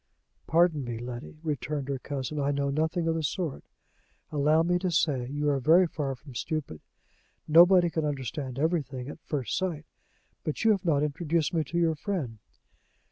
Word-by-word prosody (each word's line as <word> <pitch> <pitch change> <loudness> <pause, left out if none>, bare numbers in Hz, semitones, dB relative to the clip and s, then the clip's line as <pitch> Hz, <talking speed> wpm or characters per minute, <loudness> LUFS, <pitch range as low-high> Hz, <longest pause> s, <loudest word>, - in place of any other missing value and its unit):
"Pardon 165 -3 +3
me, 120 -2 -4
Letty," 120 +5 -7
returned 145 -2 -3
her 140 -2 -2
cousin, 140 +2 -4
"I 140 0 +1
know 140 -1 0
nothing 160 +3 0
of 165 - +2
the 165 - -1
sort. 155 -1 -3 0.7
Allow 150 +2 +3
me 175 +1 +1
to 185 0 -1
say 145 -7 +1
you 145 +2 -2
are 140 - +1
very 165 +8 +5
far 145 -5 -3
from 135 +1 -14
stupid. 140 - -4 0.7
Nobody 175 +2 +7
can 160 - -1
understand 135 -2 -3
everything 145 -5 -1
at 150 - -9
first 135 -8 -3
sight. 170 -5 -2 0.6
But 155 - -3
you 225 - +6
have 195 -3 0
not 150 -4 +3
introduced 160 +2 0
me 160 -2 +2
to 170 - -4
your 165 -2 +3
friend." 145 - -4
150 Hz, 175 wpm, -28 LUFS, 140-165 Hz, 0.7 s, Nobody